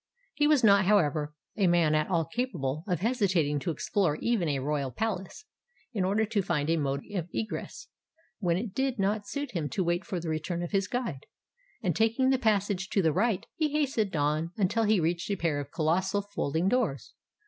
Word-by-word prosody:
He 295 0 +2
was 295 -4 +4
not, 200 -2 +6
however, 155 -7 +2 0.2
a 200 -4 +2
man 170 -3 +3
at 155 +2 +1
all 170 -3 +1
capable 160 - -3
of 180 -4 -1
hesitating 190 - +1
to 170 - -3
explore 165 +1 0
even 200 -2 0
a 140 - 0
royal 140 0 -1
palace, 195 - -4 0.5
in 200 -5 0
order 205 +4 +2
to 215 -1 0
find 160 -4 0
a 165 - +2
mode 140 -2 -1
of 180 -3 -3
egress, 220 - -5 0.5
when 175 -5 +1
it 200 0 -4
did 265 0 0
not 205 +1 0
suit 285 -2 -4
him 160 -6 -2
to 190 - -1
wait 175 +2 0
for 180 +1 -3
the 170 - -6
return 165 +2 -2
of 175 - -5
his 195 -2 +1
guide: 235 - -4 0.6
and 175 -6 +1
taking 230 +4 +2
the 265 - +2
passage 200 -4 +1
to 195 - +1
the 160 -2 +3
right, 200 +3 +1
he 305 -3 -1
hastened 260 - 0
on 150 +2 +1
until 215 +3 +2
he 210 -2 +3
reached 170 +2 -1
a 200 - +1
pair 165 -5 0
of 140 -1 -6
colossal 190 +5 +1
folding 175 -4 -1
doors. 215 - 0
185 Hz, 200 wpm, -29 LUFS, 160-220 Hz, 0.6 s, not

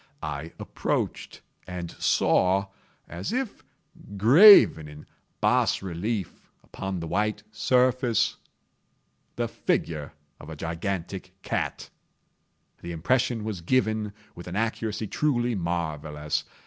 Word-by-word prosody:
I 75 +1 -5
approached - - -3 0.3
and 90 -2 -5
saw, 95 +2 +2 0.4
as 85 - -5
if 255 -2 -3 0.5
graven 125 - +8
in 75 0 -12 0.4
bas - - +2
relief 95 +2 -4
upon 95 -2 -5
the 85 - -5
white 105 +5 -1
surface, 125 +1 +2 1.0
the - - -1
figure 75 -3 -2 0.3
of - - -11
a 80 - -7
gigantic 90 +3 -4
cat. - - -3 0.9
The 85 - -6
impression 120 +6 0
was 105 -5 -4
given 110 0 0 0.2
with 85 - -11
an 90 - -6
accuracy 110 0 -2
truly 120 0 0
marvellous. 80 -5 -3
95 Hz, 105 wpm, -26 LUFS, 85-115 Hz, 1.0 s, graven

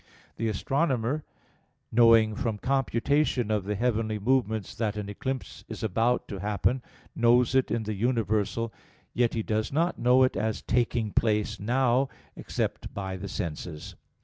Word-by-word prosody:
The 115 - -1
astronomer, 135 - 0 0.7
knowing 115 -2 +6
from 110 0 -2
computation 135 -1 +1
of 105 -3 0
the 105 +1 -1
heavenly 110 -1 0
movements 110 -2 0
that 110 -2 -2
an 105 -1 -4
eclipse 130 +6 -5
is 110 0 -6
about 115 +4 +1
to 100 - -5
happen, 105 +6 0 0.3
knows 120 +1 +4
it 130 -1 +3
in 115 - -1
the 110 0 -3
universal; 110 0 0 0.4
yet 120 -1 +1
he 110 - -1
does 110 0 -1
not 165 +5 0
know 125 +2 +5
it 130 - +2
as 110 0 -2
taking 120 -2 0
place 105 -1 +1
now, 125 +4 +2 0.3
except - - -3
by 95 -1 -4
the 100 +1 -6
senses. 80 -2 -5
115 Hz, 150 wpm, -27 LUFS, 105-125 Hz, 0.7 s, knowing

